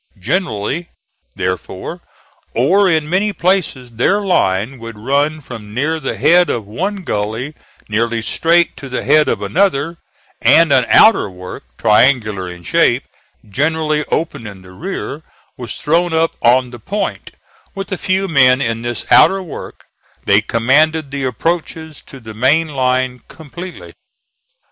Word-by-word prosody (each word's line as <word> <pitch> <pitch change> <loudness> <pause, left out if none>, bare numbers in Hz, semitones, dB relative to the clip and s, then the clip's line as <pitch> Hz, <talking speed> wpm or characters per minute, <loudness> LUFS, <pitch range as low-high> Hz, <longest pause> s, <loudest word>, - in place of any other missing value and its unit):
Generally 145 - -2 0.5
therefore, 90 0 -4 0.5
or 185 - +3
in 160 -3 +1
many 195 +6 +1
places, 175 -10 -1
their 125 - +1
line 125 - 0
would 115 -1 -9
run 145 +7 0
from 110 -5 -10
near 155 +5 0
the - - -4
head 175 +1 +4
of 115 -3 -2
one 190 - -4
gully 110 +3 -3 0.3
nearly 115 +1 -1
straight 170 +9 +2
to 135 - -9
the 125 - -3
head 150 +2 +4
of - - -1
another, 170 -3 0 0.4
and 165 -3 +5
an 125 -3 +3
outer 220 - +5
work 90 -4 -10
triangular 110 -4 +2
in 90 0 -10
shape, - - +2 0.4
generally 155 +6 0
open 155 -8 -3
in 95 -2 -11
the 90 - -14
rear, 160 - -6 0.3
was 120 -5 -6
thrown 165 +3 0
up 160 0 +1
on 125 +1 +3
the 120 - -10
point; 200 - -4 0.5
with 195 +1 -6
a - - 0
few 190 +1 -1
men 130 -6 +4
in 115 -4 -2
this 120 0 -4
outer 195 0 +5
work 170 - -9 0.4
they 100 +1 +4
commanded 140 +7 +1
the 140 -1 -3
approaches 160 +3 -3
to 135 - -13
the 110 -2 -10
main 140 +9 +2
line 130 -2 0
completely. 170 +4 -10
140 Hz, 145 wpm, -16 LUFS, 115-165 Hz, 0.5 s, and